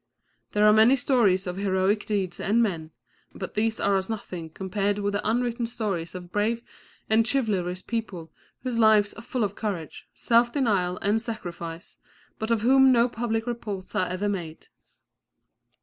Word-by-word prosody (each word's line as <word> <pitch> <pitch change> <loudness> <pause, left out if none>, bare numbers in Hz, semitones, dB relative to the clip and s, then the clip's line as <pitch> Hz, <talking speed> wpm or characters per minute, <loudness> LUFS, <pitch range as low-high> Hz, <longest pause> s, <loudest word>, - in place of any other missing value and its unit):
There 210 0 +3
are 210 - +7
many 220 +5 +6
stories 230 -8 +2
of 180 0 -4
heroic 195 +1 0
deeds 195 -4 -1
and 215 +4 +1
men, 165 -7 -2 0.5
but 190 - -6
these 220 +1 0
are 200 -1 +2
as 190 +1 -3
nothing 180 -7 -5
compared 200 +4 -2
with 205 0 -1
the 205 +1 -1
unwritten 235 0 0
stories 195 -8 -3
of 180 -1 -8
brave 225 +3 0 0.4
and 220 +1 +4
chivalrous 190 -9 -1
people 190 -9 -5 0.3
whose 250 -3 -2
lives 215 -2 +5
are 220 - -10
full 240 +1 -2
of 200 -1 -1
courage, 190 -8 -5
self 235 0 +3
denial 200 -10 +1
and 210 +2 +2
sacrifice, 175 -7 -7 0.4
but 220 - -3
of 230 -2 +2
whom 265 +3 +6
no 240 -1 +4
public 225 -2 -2
reports 215 -6 -5
are 185 - +1
ever 185 +3 -2
made. 175 -6 -5
210 Hz, 165 wpm, -26 LUFS, 185-230 Hz, 0.5 s, are